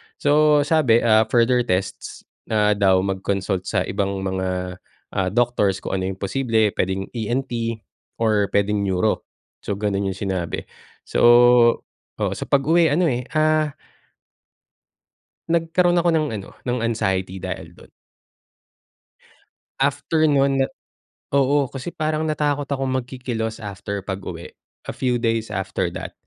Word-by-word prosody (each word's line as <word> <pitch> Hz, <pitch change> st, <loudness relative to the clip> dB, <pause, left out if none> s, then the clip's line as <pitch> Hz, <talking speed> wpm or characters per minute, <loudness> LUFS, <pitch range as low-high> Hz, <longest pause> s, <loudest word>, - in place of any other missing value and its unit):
So, 150 Hz, 0 st, +4 dB
sabi, 140 Hz, -7 st, +3 dB
ah, 110 Hz, -1 st, +4 dB
further 125 Hz, +1 st, +3 dB
tests 90 Hz, +1 st, -3 dB, 0.2 s
na 105 Hz, -1 st, +2 dB
daw, 95 Hz, -2 st, +3 dB
mag-consult 95 Hz, -1 st, -2 dB
sa 95 Hz, -3 st, +1 dB
ibang 100 Hz, 0 st, -2 dB
mga, 95 Hz, -1 st, -3 dB, 0.3 s
ah, 95 Hz, -1 st, 0 dB
doctors 105 Hz, -3 st, +1 dB
kung 95 Hz, -, -2 dB
ano 95 Hz, -, -2 dB
yung 95 Hz, -, -3 dB
posible. 110 Hz, -1 st, +1 dB
Puwedeng 95 Hz, +1 st, -2 dB
ENT 115 Hz, -1 st, -3 dB, 0.3 s
or 105 Hz, -3 st, +1 dB
pwedeng 100 Hz, +1 st, +2 dB
Neuro. 100 Hz, +2 st, 0 dB, 0.3 s
So, 100 Hz, -, -4 dB
ganun 100 Hz, -1 st, -1 dB
yung 95 Hz, -, -3 dB
sinabi. 95 Hz, -4 st, -3 dB, 0.4 s
So -, -, -2 dB, 1.0 s
oo, -, -, -1 dB
sa -, -, -5 dB
pag-uwi 160 Hz, +4 st, +3 dB
ano, 165 Hz, +5 st, +2 dB
eh, 125 Hz, +1 st, -3 dB
ah 155 Hz, -1 st, +2 dB, 1.7 s
nagkaroon 170 Hz, +1 st, +2 dB
ako 170 Hz, -, +1 dB
ng 160 Hz, -2 st, +2 dB
ano, -, -, -12 dB, 0.2 s
ng 125 Hz, 0 st, -1 dB
anxiety 95 Hz, -5 st, -1 dB
dahil 85 Hz, -2 st, -7 dB
dun. -, -, -17 dB, 1.9 s
After 150 Hz, +3 st, +1 dB
nun 135 Hz, -1 st, +3 dB
na -, -, +1 dB, 0.7 s
oo, 140 Hz, +1 st, +3 dB
kasi 135 Hz, +5 st, -5 dB
parang 155 Hz, -1 st, -2 dB
natakot 145 Hz, -2 st, -1 dB
akong 135 Hz, -2 st, -1 dB
magkikilos 120 Hz, -3 st, -4 dB
after 100 Hz, -1 st, -5 dB
pag-uwi. 95 Hz, -3 st, -6 dB, 0.3 s
A -, -, -4 dB
few 125 Hz, -2 st, 0 dB
days 115 Hz, -2 st, -1 dB
after 95 Hz, -2 st, -2 dB
that. -, -, -7 dB
115 Hz, 130 wpm, -22 LUFS, 95-140 Hz, 1.9 s, So